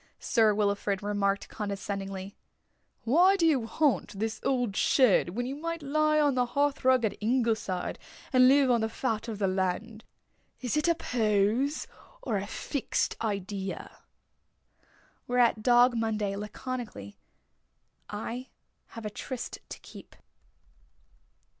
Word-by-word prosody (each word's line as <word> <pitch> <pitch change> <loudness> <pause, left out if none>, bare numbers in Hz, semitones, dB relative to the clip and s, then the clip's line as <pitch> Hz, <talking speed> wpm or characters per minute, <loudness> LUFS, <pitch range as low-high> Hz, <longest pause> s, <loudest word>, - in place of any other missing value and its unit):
Sir 225 -4 +3
Wilfrid 200 -1 0
remarked 200 -1 0
condescendingly: 195 -1 -5 0.7
"Why 345 +11 +5
do 345 -4 +2
you 270 -8 +2
haunt 225 - 0
this 220 +2 -2
old 245 -6 0
shed 245 -9 +4
when 245 +1 -1
you 260 - -3
might 335 +1 -4
lie 305 +2 +2
on 290 -2 +3
the 250 -1 +1
hearthrug 270 -4 +3
at 210 - -1
Ingleside 220 -5 0 0.3
and 255 0 +7
live 270 -1 +5
on 235 -2 +3
the 220 - 0
fat 225 -1 -2
of 220 -3 -4
the 200 - 0
land? 190 +4 -2 0.6
Is 250 0 -2
it 300 +2 +1
a 335 - +4
pose? 230 +1 +1 0.4
Or 215 - -1
a 195 +1 -4
fixed 275 +4 -2
idea?" 200 -2 -4 1.3
Whereat 245 -3 +3
Dog 245 +1 +5
Monday, 215 -3 -1
laconically: 210 - -6 0.9
"I 230 +5 -5 0.5
have 225 - -7
a 210 - -3
tryst 250 +4 -6
to - - -7
keep." - - -13
225 Hz, 130 wpm, -29 LUFS, 205-260 Hz, 1.3 s, and